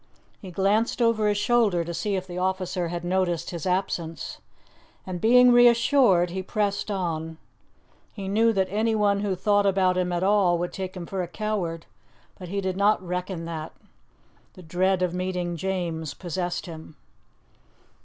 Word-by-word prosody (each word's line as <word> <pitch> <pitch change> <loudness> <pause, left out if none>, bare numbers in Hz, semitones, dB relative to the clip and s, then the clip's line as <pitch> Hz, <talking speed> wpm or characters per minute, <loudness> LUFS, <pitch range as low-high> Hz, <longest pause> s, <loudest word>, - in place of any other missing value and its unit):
He 190 - -8
glanced 200 +7 +1
over 230 -3 +2
his 205 -1 +1
shoulder 210 -6 +2
to 170 +1 -5
see 200 +4 -2
if 185 -1 -3
the 180 -1 -6
officer 185 -1 -1
had 170 0 -5
noticed 175 -2 -1
his 170 -1 -5
absence, 175 -3 -2 0.7
and 180 -2 -5
being 250 +2 +6
reassured, 240 -6 +5
he 190 +1 -3
pressed 205 +1 -2
on. 165 -5 -3 0.7
He 195 -3 -7
knew 225 +4 +3
that 195 -3 +1
anyone 210 -1 +1
who 200 -2 -1
thought 205 +2 +2
about 185 -2 +2
him 180 -1 -1
at 175 +1 -1
all 195 -3 +3
would 175 +1 -3
take 185 -1 -5
him 175 - -6
for 190 +2 -3
a 175 - -3
coward, 180 -4 -3 0.5
but 180 - -8
he 200 +2 -2
did 190 -1 -2
not 200 -2 +2
reckon 180 -1 -4
that. 160 -1 -6 0.8
The 185 - -12
dread 185 +3 +1
of 180 -1 0
meeting 180 -1 -2
James 170 -4 -3
possessed 175 0 -3
him. 160 -3 -10
185 Hz, 165 wpm, -25 LUFS, 175-205 Hz, 0.8 s, being